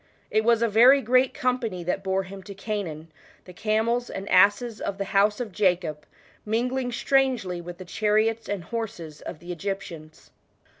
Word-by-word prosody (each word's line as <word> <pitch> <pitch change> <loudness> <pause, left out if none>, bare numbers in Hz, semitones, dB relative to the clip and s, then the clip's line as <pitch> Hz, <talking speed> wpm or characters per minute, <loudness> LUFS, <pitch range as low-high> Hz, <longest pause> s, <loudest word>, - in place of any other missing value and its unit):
It 215 - +2
was 235 0 +3
a - - +3
very 240 +6 +6
great 255 +1 +3
company 240 -8 -2
that 180 +3 -2
bore 190 0 0
him 195 +1 -10
to 200 +1 -10
Canaan; 185 -7 -5 0.3
the 180 - -12
camels 225 +5 0
and 195 +1 -6
asses 205 +4 +4
of 200 - -3
the 200 - -1
house 205 +1 +3
of 235 -4 -4
Jacob, 175 -6 0 0.4
mingling 245 +3 -1
strangely 240 -9 +1
with 175 0 -9
the 185 - -9
chariots 215 +4 0
and 200 -4 -3
horses 175 -9 -6
of - - -7
the 175 +3 -9
Egyptians. 170 -4 -6
205 Hz, 165 wpm, -25 LUFS, 180-230 Hz, 0.4 s, very